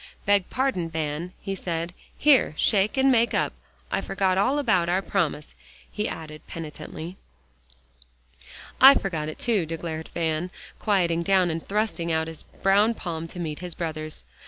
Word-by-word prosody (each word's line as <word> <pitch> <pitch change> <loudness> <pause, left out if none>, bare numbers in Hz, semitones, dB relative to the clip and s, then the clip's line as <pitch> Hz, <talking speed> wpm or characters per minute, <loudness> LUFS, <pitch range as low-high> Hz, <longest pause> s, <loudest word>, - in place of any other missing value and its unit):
"Beg 200 -2 +3
pardon, 255 -11 0
Van," 160 +2 -3
he 195 - -2
said. 170 -2 -3 0.2
"Here, 275 - +4
shake, 205 +4 +2
and 265 0 +5
make 235 -1 +3
up. - - +1 0.4
I - - +1
forgot 190 -1 0
all 250 +9 +2
about 190 -12 +2
our 185 +2 +1
promise," 165 -7 -1 0.4
he 210 - -2
added 155 -1 -7
penitently. 160 +2 -7 1.6
"I 270 +2 +11
forgot 160 -6 -2
it, 155 - -7
too," 210 -9 +1
declared 160 0 -5
Van, 165 +1 -1 0.3
quieting 175 -5 +2
down, 185 -1 +3
and 160 0 -3
thrusting 200 -5 0
out 160 0 +1
his 160 -1 -6
brown 205 +4 +2
palm 165 -4 -4
to 170 - -11
meet 155 -3 -4
his 180 -2 -6
brother's. 155 - -4
175 Hz, 155 wpm, -25 LUFS, 160-200 Hz, 1.6 s, I